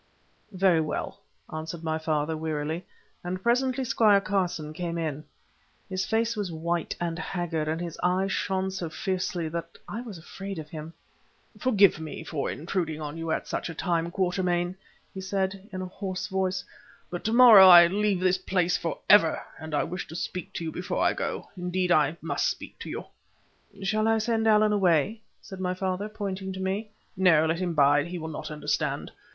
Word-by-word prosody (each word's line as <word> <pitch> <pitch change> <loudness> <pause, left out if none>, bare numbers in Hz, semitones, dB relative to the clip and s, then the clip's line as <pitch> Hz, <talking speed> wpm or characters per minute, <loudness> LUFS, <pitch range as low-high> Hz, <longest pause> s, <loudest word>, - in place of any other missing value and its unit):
"Very 185 -4 +3
well," 155 - -4 0.3
answered 160 +1 -5
my 160 0 -1
father, 155 0 -1
wearily, 155 +1 -3 0.4
and 185 +1 -4
presently 255 +2 +2
Squire 215 -4 +4
Carson 180 -6 -1
came 170 +1 -3
in. 155 -3 -3 0.7
His 190 0 -2
face 225 +3 +1
was 205 -4 -3
white 170 +1 -2
and 170 -1 -2
haggard, 175 -5 -2
and 160 +1 -1
his 170 -2 -6
eyes 185 +2 +1
shone 190 -1 -1
so 185 -3 -4
fiercely 180 0 -2
that 170 +1 -6
I 225 - -5
was 225 -7 -8
afraid 195 +3 -7
of 155 -1 -8
him. 155 0 -7 0.7
"Forgive 205 -10 +4
me 160 0 -6
for 155 -3 -3
intruding 160 -1 -2
on 150 -1 -5
you 165 0 -4
at - - -1
such - - -3
a 165 - -6
time, 170 -1 0
Quatermain," 180 -1 0 0.4
he 190 - -6
said, 190 +1 -2
in 185 -1 -4
a - - -3
hoarse 185 0 -4
voice, 190 -1 -1 0.5
"but 175 - -5
to 220 - +1
morrow 230 -6 +10
I 175 -2 +10
leave 200 +1 +1
this 185 0 +2
place 180 -2 +1
for 165 - -2
ever, 180 -6 +6 0.2
and 155 -1 -5
I - - +2
wish 180 +2 -5
to 165 - -9
speak 180 +1 -4
to - - -4
you 160 - -3
before 180 - -2
I - - +3
go—indeed, 180 -1 -3
I 155 0 +3
must - - 0
speak - - -7
to - - -7
you." - - -5 0.8
"Shall 215 +3 +1
I 225 0 +4
send 225 0 0
Allan 215 -1 +5
away?" 195 +2 +2 0.2
said 190 -2 -9
my 185 -1 -1
father, 190 +2 -2
pointing 195 -2 -4
to 190 - -7
me. 195 +3 -2 0.3
"No; 175 -4 +5
let 165 +1 0
him 175 -3 -2
bide. 145 +1 +4
He 175 +1 -5
will 160 -1 -5
not 155 - -6
understand." 150 -1 -2
180 Hz, 185 wpm, -27 LUFS, 165-195 Hz, 0.8 s, morrow